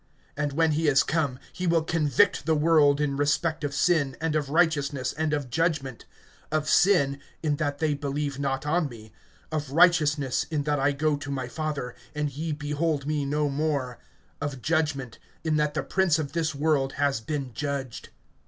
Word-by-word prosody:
(8)And 145 -1 -2
when 160 +1 +3
he 155 +1 +1
is 140 -2 +5
come, 150 -6 -1 0.2
he 180 - -3
will 165 -1 +3
convict 160 +4 +2
the 160 - +3
world, 150 -2 +4
in 145 -2 0
respect 145 +3 0
of 145 - -1
sin, 145 -3 +1
and 160 0 -1
of 145 -3 -1
righteousness, 145 -5 +1
and 155 0 -1
of 145 -4 -2
judgment; 150 -6 -1 0.5
(9)of 155 -1 0
sin, 145 -9 +3 0.2
in 150 -2 +1
that 145 -1 -1
they 155 0 +1
believe 140 -1 -3
not 135 -1 -2
on 155 0 +1
me; 110 -3 -12 0.4
(10)of 150 -2 -2
righteousness, 155 -6 +3
in 150 -3 -1
that 145 0 0
I 135 +2 +3
go 150 +1 0
to 145 0 -7
my 130 -3 -3
Father, 145 -3 -4 0.2
and 150 -1 -1
ye 160 +3 -3
behold 150 0 -1
me 150 -1 -1
no 150 +1 0
more; 140 -3 -2 0.4
(11)of 145 -3 -4
judgment, 150 -7 -1 0.2
in 155 -1 +1
that 150 0 0
the - - -1
prince 185 -5 +2
of 150 -3 -3
this 160 -2 -1
world 140 -2 +1
has 140 -5 0
been 135 0 -4
judged. 140 -2 -4
150 Hz, 180 wpm, -26 LUFS, 140-155 Hz, 0.5 s, is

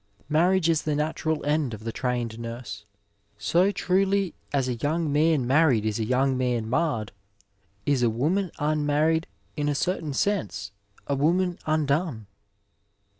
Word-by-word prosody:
Marriage 175 +3 +3
is 165 -2 +2
the 150 -1 -1
natural 155 +1 -1
end 145 -5 0
of 110 - -13
the 115 - -3
trained 120 -2 -2
nurse. 115 -3 -7 0.5
So 170 - +2
truly 195 -1 +1 0.2
as 135 -3 +1
a 125 - 0
young 150 +5 -1
man 150 -3 +3
married 130 -4 +3
is 110 0 -1
a - - 0
young 130 +3 +2
man 125 -3 0
marred, 125 -5 0 0.7
is 140 -3 +2
a 120 - +4
woman 165 - 0
unmarried, 150 +2 +1 0.3
in 145 -1 0
a 145 - 0
certain 160 -2 -1
sense, 160 - -1 0.3
a 140 - -1
woman 175 +6 +1
undone. 150 - 0
145 Hz, 145 wpm, -26 LUFS, 125-165 Hz, 0.7 s, a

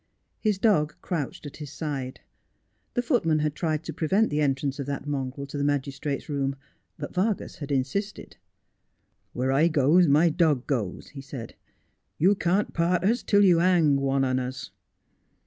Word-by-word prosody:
His 210 -3 +1
dog 190 -8 +2
crouched 155 -5 -4
at 145 - -8
his 150 -2 -8
side. 140 -5 -5 0.7
The 245 - +1
footman 185 - +2
had 150 -1 0
tried 155 0 -2
to - - -6
prevent 195 +6 +1
the 150 +1 0
entrance 140 0 0
of 140 - -4
that 140 -1 -4
mongrel 140 -1 -3
to 140 +1 -6
the - - 0
magistrate's 140 0 -2
room, 140 -2 -1 0.4
but - - -6
Vargas 200 +3 -1
had 145 -1 -7
insisted. 140 +11 -2 0.5
' - - -47
Where 130 +2 0
I 145 +5 +4
goes 160 +3 +4
my 150 +4 +5
dog 155 -6 +2
goes,' 115 -10 -3
he 140 - -9
said. 135 -4 -8 0.3
' 90 +7 -48
You 185 +6 +4
can't 190 +1 0
part 170 +1 +1
us 230 +6 +2
till 205 -1 +3
you 175 -3 +5
hang 170 -5 +4
one 135 0 +1
on 130 -1 +1
us.' 130 -7 -5
150 Hz, 175 wpm, -26 LUFS, 135-175 Hz, 0.7 s, my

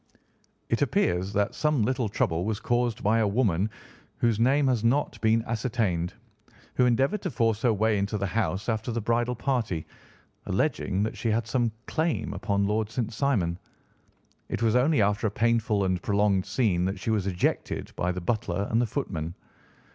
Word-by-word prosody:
It - - 0
appears 90 +3 +1
that 100 0 +1
some 150 -6 +1
little 125 -1 0
trouble 85 -4 0
was 105 +1 -2
caused 120 -1 0
by 110 +3 +3
a 110 - +3
woman, 100 -3 +1 0.5
whose 115 -2 +1
name 135 +5 +3
has 125 -4 +1
not 120 -2 +1
been 110 +1 +3
ascertained, 110 -7 -1 0.6
who 125 - +3
endeavoured 135 - +2
to 185 - -2
force 115 -4 +1
her 120 - +3
way 110 0 +2
into 100 +2 -1
the 100 - -1
house 95 -2 -1
after 110 +1 -1
the 115 - -1
bridal 120 +2 0
party, 115 - -1 0.6
alleging 95 +2 0
that 110 - -2
she 115 - -1
had 110 +1 +1
some 120 0 0
claim 160 0 -1
upon 100 0 0
Lord 105 +1 0
St. 115 -1 -3
Simon. 100 -10 0 0.9
It - - -2
was 115 0 +3
only 125 -2 +4
after 105 +2 +1
a - - 0
painful 115 -1 +1
and 90 -2 0
prolonged 100 -2 +1
scene 100 -9 +1
that 95 +1 -2
she 110 - -2
was 105 -3 0
ejected 90 -2 -1
by 90 - 0
the 90 0 -4
butler 100 -1 -1
and 115 +2 +3
the 120 - +1
footman. 85 - -4
110 Hz, 175 wpm, -27 LUFS, 100-120 Hz, 0.9 s, only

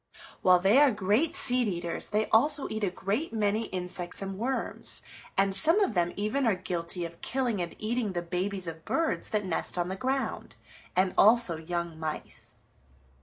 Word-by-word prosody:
While 185 -1 +6
they 195 +8 +4
are 290 -1 +6
great 215 - 0
seed 250 -2 +7
eaters 170 -3 -3
they 215 +1 +1
also 285 +5 +4
eat 215 0 -3
a 195 - +2
great 205 - -3
many 215 0 0
insects 180 -1 -3
and 195 0 -5
worms, 260 +3 -2 0.3
and 195 0 +2
some 325 - +3
of 400 - +1
them 175 -2 +1
even 230 +6 -1
are 215 - +3
guilty 175 -1 -4
of 170 0 -10
killing 245 -7 -1
and 170 - -5
eating 220 -2 -2
the 175 -1 -3
babies 185 +2 -3
of 165 -1 -7
birds 330 -1 0
that 210 -2 -1
nest 180 0 -3
on 175 0 -1
the 190 - -3
ground, 265 +6 -3 0.4
and 185 0 +2
also 220 -4 +5
young 170 0 -4
mice. 155 -1 -6
195 Hz, 175 wpm, -28 LUFS, 180-235 Hz, 0.4 s, seed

